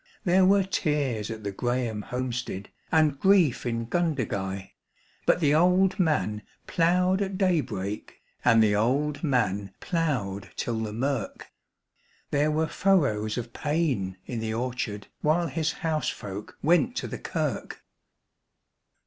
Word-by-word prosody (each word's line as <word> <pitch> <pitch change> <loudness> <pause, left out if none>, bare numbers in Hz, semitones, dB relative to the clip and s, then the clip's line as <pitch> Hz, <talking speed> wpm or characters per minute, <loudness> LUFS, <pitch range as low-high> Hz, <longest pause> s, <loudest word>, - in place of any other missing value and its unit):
There 185 -1 +4
were 200 0 +5
tears 145 - -1
at 110 -1 -6
the 100 - -2
Grahame 120 0 -1
homestead 125 -5 -4 0.2
and 155 -4 +3
grief 180 -11 +4
in 115 -1 -1
Gundagai; 110 - -2 0.6
But - - +4
the 145 -2 +4
old 180 +4 +4
man 150 - +1 0.2
ploughed 180 +3 +2
at 195 -1 -2
daybreak 130 - -1 0.2
and 115 -2 +6
the 105 -1 +3
old 140 +9 +1
man 100 - 0
ploughed 130 - -2
till 115 -2 -2
the 110 -1 -3
mirk 125 0 -3 0.8
There 150 +1 +2
were 155 +1 +1
furrows 140 - +1
of 120 -1 -5
pain 140 - -1
in 120 - -4
the 110 0 -2
orchard 120 -4 -3 0.2
while 160 +3 +2
his 160 +1 -1
housefolk 105 -10 -3
went 175 - +3
to - - -2
the - - -6
kirk. - - -3
135 Hz, 130 wpm, -27 LUFS, 110-165 Hz, 0.8 s, and